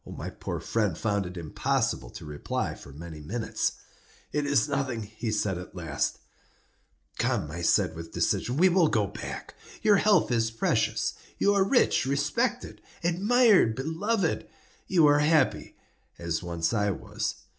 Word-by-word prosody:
My - - -6
poor - - -5
friend 105 -7 -1
found 100 -4 0
it 90 0 -9
impossible 80 -3 -1
to - - -10
reply 75 -1 -3
for 70 - -12
many 80 +2 -9
minutes. 110 +9 -2 0.6
"It 150 -1 -1
is 145 0 +3
nothing," 135 -5 -2
he 110 +2 -5
said, 105 -4 0
at 90 - -10
last. 80 -5 -2 1.0
"Come," 75 - 0
I 85 +2 -5
said, 85 - +3
with 80 0 -8
decision, 125 +3 0
"we 185 +4 +6
will 180 -2 +4
go 110 -7 +2
back; 100 - -7 0.3
your 210 -2 +6
health 200 -10 +3
is 115 -1 +2
precious. 115 0 0 0.2
You 200 - +3
are 200 -1 +4
rich, 200 - +3
respected, 190 - -1 0.2
admired, 200 - +4
beloved; 165 - -1 0.4
you 175 -4 +4
are 145 0 +5
happy, 150 -2 +2 0.4
as 85 -1 -2
once 85 +2 -2
I 105 -2 +1
was. 95 - -3
120 Hz, 150 wpm, -27 LUFS, -, 1.0 s, we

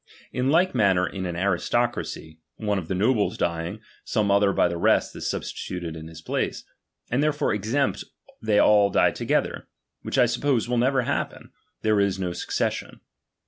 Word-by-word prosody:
In 125 +1 0
like 175 +5 +3
manner 95 -6 +3
in 95 -1 -4
an 85 - -4
aristocracy, 85 -3 -1 0.2
one 105 -2 -1
of 85 - -8
the 95 - -2
nobles 105 +2 +1
dying, 85 +4 -2 0.2
some 105 -3 0
other 100 0 +4
by 90 - +3
the 85 -1 -4
rest - - +2
is - - -3
substituted 85 -3 -5
in 80 0 -8
his 80 -1 -11
place; - - -2 0.5
and 125 +4 +2
therefore 150 -1 +1
except 115 +7 0 0.4
they 110 -2 +2
all 105 -1 +5
die - - +3
together, - - -1 0.3
which - - -3
I 125 - +6
suppose 120 0 0
will 120 -1 +1
never 130 +1 +2
happen, - - -3 0.3
there 110 -1 +3
Is 100 -1 +1
no 90 -2 -2
succession. 90 - -3
100 Hz, 170 wpm, -25 LUFS, 90-120 Hz, 0.5 s, I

